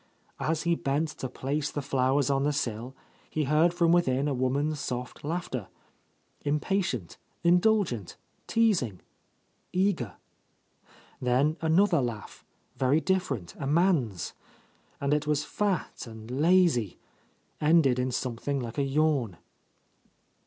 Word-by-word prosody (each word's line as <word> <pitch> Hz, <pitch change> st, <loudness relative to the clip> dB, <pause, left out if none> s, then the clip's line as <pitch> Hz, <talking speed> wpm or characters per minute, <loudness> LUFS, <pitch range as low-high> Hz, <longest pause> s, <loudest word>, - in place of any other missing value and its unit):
As 160 Hz, 0 st, -1 dB
he 170 Hz, 0 st, +2 dB
bent 150 Hz, 0 st, 0 dB
to 130 Hz, -4 st, -6 dB
place 140 Hz, +4 st, -2 dB
the -, -, -4 dB
flowers 135 Hz, +1 st, +1 dB
on 135 Hz, 0 st, +2 dB
the 145 Hz, -, +2 dB
sill, 125 Hz, -2 st, -3 dB, 0.3 s
he 155 Hz, -, -1 dB
heard 155 Hz, +4 st, +3 dB
from 170 Hz, -1 st, +2 dB
within 140 Hz, -5 st, +2 dB
a 145 Hz, -, 0 dB
woman's 140 Hz, +4 st, 0 dB
soft 125 Hz, -2 st, -5 dB
laughter; 150 Hz, -, -3 dB, 0.8 s
impatient, 145 Hz, -, -1 dB, 0.3 s
indulgent, 175 Hz, -, +2 dB, 0.3 s
teasing, 180 Hz, -, +1 dB, 0.7 s
eager. 180 Hz, -, 0 dB, 1.1 s
Then 130 Hz, +5 st, +2 dB
another 165 Hz, 0 st, +3 dB
laugh, 115 Hz, -5 st, -5 dB, 0.3 s
very 135 Hz, +4 st, +3 dB
different, 160 Hz, -, -1 dB
a 135 Hz, -, -3 dB
man's. 145 Hz, -, +1 dB, 0.7 s
And 140 Hz, +1 st, +1 dB
it 150 Hz, 0 st, 0 dB
was 150 Hz, -1 st, +1 dB
fat 200 Hz, -10 st, -2 dB
and 110 Hz, +1 st, -10 dB
lazy, 150 Hz, -, +3 dB, 0.3 s
— -, -, -38 dB
ended 150 Hz, -5 st, +4 dB
in 125 Hz, +1 st, 0 dB
something 125 Hz, +3 st, -2 dB
like 120 Hz, +2 st, -5 dB
a -, -, +2 dB
yawn. 135 Hz, -, +1 dB
145 Hz, 125 wpm, -28 LUFS, 125-165 Hz, 1.1 s, ended